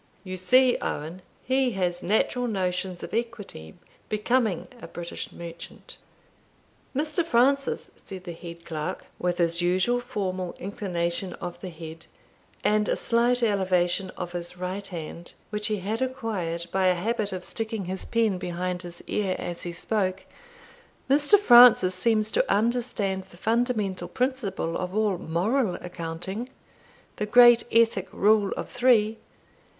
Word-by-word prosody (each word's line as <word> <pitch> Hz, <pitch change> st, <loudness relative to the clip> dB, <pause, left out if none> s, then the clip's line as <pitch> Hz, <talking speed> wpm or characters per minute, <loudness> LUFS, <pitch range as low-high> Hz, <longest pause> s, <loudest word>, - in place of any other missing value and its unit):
You 185 Hz, -1 st, -5 dB
see, 250 Hz, +8 st, +4 dB
Owen, 160 Hz, +5 st, -4 dB, 0.2 s
he 260 Hz, -1 st, +1 dB
has 180 Hz, -2 st, -1 dB
natural 230 Hz, +5 st, +1 dB
notions 185 Hz, -3 st, -2 dB
of -, -, -7 dB
equity 220 Hz, -, -4 dB, 0.3 s
becoming 215 Hz, -3 st, +1 dB
a -, -, -8 dB
British 170 Hz, 0 st, -7 dB
merchant." 170 Hz, 0 st, -10 dB, 1.0 s
"Mr. 305 Hz, +4 st, 0 dB
Francis," 275 Hz, -1 st, +2 dB
said 190 Hz, -2 st, -9 dB
the 175 Hz, -, -6 dB
head 170 Hz, 0 st, -10 dB
clerk, 155 Hz, -2 st, -4 dB
with 175 Hz, 0 st, 0 dB
his 170 Hz, -1 st, +2 dB
usual 185 Hz, +8 st, +2 dB
formal 190 Hz, -7 st, -3 dB
inclination 180 Hz, -2 st, -3 dB
of 175 Hz, -2 st, -7 dB
the 185 Hz, -, -5 dB
head, 160 Hz, -1 st, -10 dB, 0.6 s
and 210 Hz, 0 st, +2 dB
a -, -, +2 dB
slight 240 Hz, +1 st, +2 dB
elevation 190 Hz, -3 st, +1 dB
of 175 Hz, -1 st, -4 dB
his 175 Hz, 0 st, -6 dB
right 185 Hz, +2 st, -4 dB
hand, 170 Hz, -1 st, -6 dB, 0.2 s
which 210 Hz, 0 st, 0 dB
he 215 Hz, -, 0 dB
had 210 Hz, +5 st, -3 dB
acquired 215 Hz, -11 st, -2 dB
by 190 Hz, -1 st, +2 dB
a 180 Hz, -, +4 dB
habit 215 Hz, +3 st, -1 dB
of 185 Hz, -1 st, -5 dB
sticking 220 Hz, -3 st, -3 dB
his 185 Hz, +1 st, -4 dB
pen 225 Hz, -5 st, +1 dB
behind 180 Hz, 0 st, -3 dB
his 175 Hz, -1 st, -9 dB
ear 195 Hz, -3 st, -1 dB
before 175 Hz, -, -4 dB
he 175 Hz, -, -4 dB
spoke 190 Hz, +1 st, -1 dB, 0.9 s
"Mr. 290 Hz, +8 st, +6 dB
Francis 240 Hz, -, +8 dB
seems 215 Hz, +2 st, +2 dB
to -, -, +1 dB
understand 210 Hz, -3 st, 0 dB
the 180 Hz, -2 st, -17 dB
fundamental 215 Hz, -5 st, 0 dB
principle 245 Hz, -10 st, -2 dB
of 180 Hz, +1 st, -4 dB
all 210 Hz, -4 st, +1 dB
moral 185 Hz, +7 st, 0 dB
accounting, 180 Hz, +6 st, -5 dB, 0.7 s
the 210 Hz, -, -2 dB
great 240 Hz, +1 st, +7 dB
ethic 225 Hz, -4 st, +3 dB
rule 205 Hz, -1 st, +3 dB
of -, -, -4 dB
three. 225 Hz, -3 st, +3 dB
195 Hz, 140 wpm, -26 LUFS, 180-230 Hz, 1.0 s, Francis